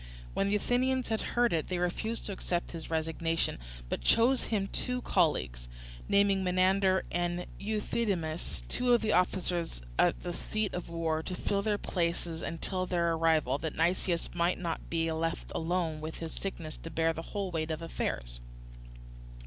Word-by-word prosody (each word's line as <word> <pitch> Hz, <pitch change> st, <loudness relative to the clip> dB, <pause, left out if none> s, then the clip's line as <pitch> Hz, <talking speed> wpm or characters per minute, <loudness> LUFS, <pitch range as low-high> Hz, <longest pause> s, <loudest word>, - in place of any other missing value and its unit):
When 195 Hz, -, +1 dB
the 205 Hz, -, +2 dB
Athenians 255 Hz, +4 st, +1 dB
had 220 Hz, -1 st, 0 dB, 0.2 s
heard 240 Hz, -3 st, +4 dB
it 160 Hz, -2 st, 0 dB
they 180 Hz, -, -1 dB
refused 200 Hz, +6 st, -1 dB
to -, -, -2 dB
accept 175 Hz, -2 st, -2 dB
his 165 Hz, -2 st, -6 dB
resignation, 165 Hz, -, 0 dB, 0.3 s
but -, -, -2 dB
chose 240 Hz, -, +4 dB
him 205 Hz, -3 st, 0 dB
two 250 Hz, +5 st, -1 dB
colleagues, 65 Hz, -, +1 dB, 0.4 s
naming 200 Hz, -1 st, +4 dB
Menander 185 Hz, +1 st, +3 dB
and 175 Hz, 0 st, 0 dB
Euthydemus, 200 Hz, -6 st, -1 dB
two 250 Hz, 0 st, +2 dB
of 240 Hz, -, +5 dB
the 215 Hz, -1 st, +1 dB
officers 175 Hz, -, 0 dB, 0.2 s
at -, -, +3 dB
the 175 Hz, -1 st, -3 dB
seat 215 Hz, +3 st, -2 dB
of 180 Hz, -, -4 dB
war, 165 Hz, -1 st, 0 dB
to 180 Hz, +3 st, -4 dB
fill 200 Hz, +2 st, 0 dB
their 210 Hz, 0 st, +1 dB
places 170 Hz, -3 st, -1 dB
until 185 Hz, +2 st, -2 dB
their 170 Hz, -2 st, +2 dB
arrival, 160 Hz, -5 st, +2 dB
that 160 Hz, -1 st, -4 dB
Nicias 170 Hz, +1 st, +1 dB
might 175 Hz, +1 st, +2 dB
not 170 Hz, -2 st, -4 dB
be 165 Hz, -1 st, +1 dB
left 165 Hz, +1 st, -2 dB
alone 165 Hz, -2 st, -1 dB
in 155 Hz, -, -3 dB
his 165 Hz, -1 st, -5 dB
sickness 165 Hz, -5 st, -5 dB
to 165 Hz, -, -8 dB
bear 165 Hz, 0 st, +2 dB
the 165 Hz, -, -5 dB
whole 195 Hz, +1 st, -3 dB
weight 160 Hz, -1 st, -1 dB
of 160 Hz, +1 st, -3 dB
affairs. -, -, -3 dB
175 Hz, 165 wpm, -31 LUFS, 165-200 Hz, 0.4 s, of